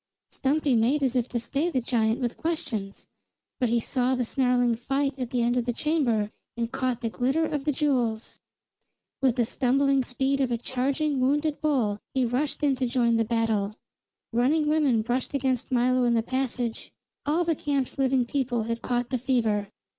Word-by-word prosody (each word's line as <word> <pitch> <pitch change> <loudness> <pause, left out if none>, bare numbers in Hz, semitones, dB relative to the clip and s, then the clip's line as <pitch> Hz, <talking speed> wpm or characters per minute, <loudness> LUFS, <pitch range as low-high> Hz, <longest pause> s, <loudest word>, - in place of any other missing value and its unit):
Stumpy 280 -1 +1
made 255 +6 +2
as 260 -1 +1
if 245 -1 0
to 240 - -1
stay 285 +8 -1
the 265 - 0
giant 225 -2 +1
with 240 -2 -2
questions; 225 -12 -3 0.5
but 250 -3 +1
he 235 +1 +2
saw 255 +2 0
the 250 -1 -1
snarling 245 -1 +2
fight 275 +4 -1
at 250 -2 -3
the 245 -1 0
end 240 +1 +1
of 245 -1 0
the 245 - 0
chamber 235 -8 0 0.3
and 235 0 -2
caught 255 -2 -1
the 230 - -1
glitter 270 +8 +1
of 295 -1 -1
jewels. 250 -6 -1 0.8
With 260 -3 +3
the 240 -3 +2
stumbling 270 +3 +2
speed 265 +3 0
of 260 -2 0
a 235 - +1
charging, 265 +4 -1
wounded 290 +4 +1
bull, 250 -9 +1 0.2
he 260 -1 +3
rushed 270 +5 -2
in 280 -2 +3
to 255 -1 0
join 235 -2 +2
battle. 225 -2 0 0.6
Running 290 +6 +2
women 290 -8 +2
brushed 245 +4 -2
against 260 -2 -1
Milo 255 0 +3
in 240 -1 +3
the 225 - +2
passage; 255 -2 -3 0.4
all 320 +4 +2
the 335 -1 +1
camp's 280 -3 -2
living 260 -2 +2
people 245 -3 -1
had 230 +1 -3
caught 245 0 -1
the 255 - 0
fever. 225 -5 0
255 Hz, 180 wpm, -26 LUFS, 235-275 Hz, 0.8 s, With